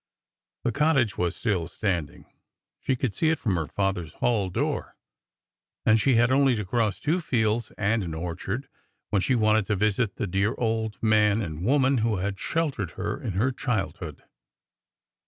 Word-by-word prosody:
The 120 Hz, -, +1 dB
cottage 140 Hz, -7 st, +2 dB
was 90 Hz, -1 st, -1 dB
still 95 Hz, -8 st, -1 dB
standing; 90 Hz, -8 st, -3 dB, 0.5 s
she 135 Hz, -, 0 dB
could 125 Hz, -4 st, -2 dB
see 160 Hz, -, +2 dB
it 160 Hz, -, +2 dB
from 105 Hz, -8 st, -1 dB
her 80 Hz, -3 st, -1 dB
father's 95 Hz, -5 st, -2 dB
hall 105 Hz, -6 st, 0 dB
door. 90 Hz, -, -2 dB, 0.9 s
And 110 Hz, 0 st, +5 dB
she 135 Hz, +1 st, +3 dB
had 120 Hz, +2 st, +4 dB
only 135 Hz, -1 st, +4 dB
to 105 Hz, -2 st, -3 dB
cross 110 Hz, +1 st, 0 dB
two 160 Hz, +4 st, +1 dB
fields 115 Hz, -5 st, 0 dB
and 110 Hz, +2 st, +1 dB
an 80 Hz, -3 st, -4 dB
orchard 90 Hz, -, -4 dB, 0.4 s
when 100 Hz, -, +2 dB
she 130 Hz, -, +2 dB
wanted 110 Hz, -2 st, +3 dB
to 105 Hz, -, +1 dB
visit 105 Hz, +2 st, +1 dB
the 120 Hz, -, -2 dB
dear 100 Hz, +3 st, 0 dB
old 110 Hz, -2 st, -1 dB
man 105 Hz, -1 st, +4 dB
and 85 Hz, -5 st, -4 dB
woman 135 Hz, +2 st, +3 dB
who 110 Hz, -1 st, +1 dB
had 95 Hz, +1 st, -3 dB
sheltered 140 Hz, -, -2 dB
her 105 Hz, +8 st, -3 dB
in 115 Hz, -8 st, -3 dB
her 115 Hz, +8 st, +1 dB
childhood. 95 Hz, -, -3 dB
110 Hz, 170 wpm, -26 LUFS, 95-125 Hz, 0.9 s, And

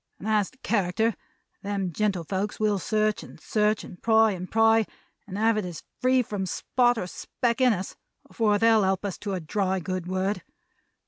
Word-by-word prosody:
As 215 Hz, -2 st, +2 dB
to 255 Hz, -, -25 dB
character, 220 Hz, +2 st, +1 dB, 0.5 s
them 200 Hz, -2 st, -2 dB
gentlefolks 195 Hz, +1 st, -1 dB
will 210 Hz, -2 st, +2 dB
search 215 Hz, +2 st, 0 dB
and -, -, -12 dB
search, 210 Hz, 0 st, +1 dB
and 180 Hz, -, -12 dB
pry 220 Hz, -1 st, +4 dB
and 185 Hz, -1 st, -6 dB
pry, 225 Hz, 0 st, +4 dB, 0.4 s
and 195 Hz, -1 st, -6 dB
have 220 Hz, +1 st, +3 dB
it 210 Hz, -, -1 dB
as 175 Hz, -3 st, -7 dB, 0.2 s
free 255 Hz, 0 st, +4 dB
from 200 Hz, -4 st, -4 dB
spot 245 Hz, +6 st, +1 dB
or 200 Hz, -, -2 dB
speck 235 Hz, +6 st, -2 dB
in 255 Hz, -1 st, +6 dB
us, 190 Hz, -3 st, -3 dB, 0.3 s
afore 210 Hz, -3 st, +1 dB
they'll 225 Hz, 0 st, +5 dB
help 190 Hz, 0 st, 0 dB
us 195 Hz, -, -4 dB
to 200 Hz, -2 st, -4 dB
a -, -, -2 dB
dry 190 Hz, +3 st, -1 dB
good 185 Hz, +1 st, -4 dB
word! 190 Hz, +2 st, -1 dB
210 Hz, 180 wpm, -26 LUFS, 190-225 Hz, 0.5 s, in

